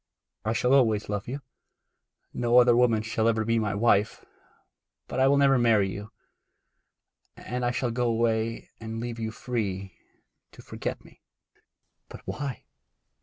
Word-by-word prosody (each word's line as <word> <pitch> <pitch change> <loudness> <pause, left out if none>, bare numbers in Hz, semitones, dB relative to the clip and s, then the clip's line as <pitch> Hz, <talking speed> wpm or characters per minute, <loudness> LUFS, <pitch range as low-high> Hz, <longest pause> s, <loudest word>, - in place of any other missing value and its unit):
I 110 - 0
shall 125 +2 +2
always 110 -7 +3
love 105 -1 -3
you. 135 +4 -5 0.9
No 120 0 +2
other 120 -1 +6
woman 115 -3 +3
shall 115 0 0
ever 110 -1 +1
be 115 +1 +2
my 105 -2 -1
wife; 105 -1 +2 0.8
but - - -4
I 130 - +5
will 140 +1 +4
never 135 -2 +4
marry 110 -5 +3
you; 105 +3 -7 1.3
and 125 0 -4
I 120 - +2
shall 125 0 -1
go 120 +1 0
away 115 0 -1
and 115 0 -6
leave 120 0 -5
you 110 -1 -2
free 100 -5 -4 0.6
to - - -14
forget - - -5
me.' - - -19 0.9
'But - - -10
why? 140 -4 -5
115 Hz, 150 wpm, -27 LUFS, 110-125 Hz, 1.3 s, other